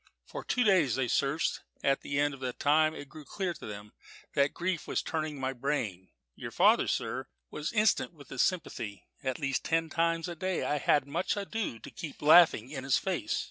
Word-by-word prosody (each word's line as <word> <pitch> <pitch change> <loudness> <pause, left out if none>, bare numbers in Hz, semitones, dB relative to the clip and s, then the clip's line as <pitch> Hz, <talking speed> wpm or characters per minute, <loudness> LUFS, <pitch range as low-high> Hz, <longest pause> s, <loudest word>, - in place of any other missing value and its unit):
For - - -7
two 250 - +1
days 180 - +4
they 130 -2 0
searched; 140 +6 0 0.2
at 135 0 +2
the 140 0 -2
end 145 0 +2
of 135 - -10
that 125 -2 -4
time 155 +2 +3
it 145 - -8
grew 155 +2 -11
clear 185 +4 -3
to - - -10
them 105 0 -8 0.4
that 140 0 +3
grief 180 -2 -2
was - - -1
turning 155 -3 -3
my 130 0 -1
brain. 120 -9 -3 0.2
Your - - -7
father, - - +4
sir, - - -2 0.2
was 150 +1 -3
instant 215 -4 +2
with 150 -4 -16
his 135 - -1
sympathy 110 - -2 0.2
at 130 -1 -1
least 140 -3 -1
ten 165 0 0
times 165 0 +1
a 175 - -5
day 185 +2 -2
I 150 - 0
had 145 0 +3
much 170 +8 -1
ado 205 - -3
to 110 - -11
keep 165 -4 -7
from 150 - -1
laughing 155 -8 +7
in 135 -3 -5
his 130 0 +3
face. - - -1
150 Hz, 210 wpm, -30 LUFS, 135-170 Hz, 0.4 s, laughing